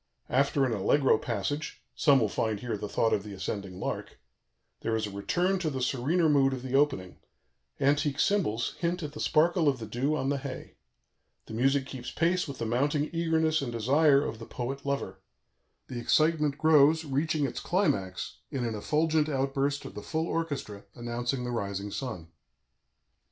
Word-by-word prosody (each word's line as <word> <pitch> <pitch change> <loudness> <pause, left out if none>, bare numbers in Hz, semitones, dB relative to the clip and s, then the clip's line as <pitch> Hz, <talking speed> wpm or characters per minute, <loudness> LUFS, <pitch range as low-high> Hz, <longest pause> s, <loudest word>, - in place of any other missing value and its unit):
After 140 +1 +3
an 125 - 0
allegro 110 +4 +3
passage 145 +2 -3
(some 140 -4 +4
will 110 - +2
find 110 0 -1
here 120 -1 -3
the 105 0 -5
thought 115 - +1
of - - +1
the 105 0 -9
ascending 95 -1 -5
lark), - - -4 0.6
there 115 - -1
is 110 -1 0
a 105 - -6
return 180 - 0
to 165 -3 -1
the 135 -3 -3
serener 140 +7 +1
mood 135 -3 +4
of 130 -1 -5
the 130 -1 -5
opening; 135 -11 +1 0.6
antique 145 +1 +2
cymbals 115 - +1
hint 175 0 -1
at 150 - -4
the 150 - -8
sparkle 165 0 +3
of 135 - 0
the 115 - -6
dew 135 +7 -1
on 135 -3 -1
the 140 -1 0
hay. 130 -1 -7 0.7
The - - -9
music 135 +4 +2
keeps 130 -2 -7
pace 175 +2 +1
with 140 -2 -6
the 115 - -3
mounting 145 +6 0
eagerness 160 -2 +1
and 130 -3 -3
desire 140 +5 +4
of 110 - -5
the 115 - -9
poet 135 +3 -5
lover; 115 -9 -2 0.7
the 125 - -6
excitement 150 +2 +2
grows, 155 0 +5
reaching 150 +2 0
its 130 - -3
climax 100 - -1
in 130 -3 -2
an 115 - -2
effulgent 155 +7 +1
outburst 140 0 0
of - - -8
the - - -7
full 160 0 -2
orchestra, 140 -13 -3
announcing 120 +2 -3
the 125 - -3
rising 100 -3 -3
sun. 110 -12 -5
135 Hz, 180 wpm, -29 LUFS, 115-155 Hz, 0.7 s, grows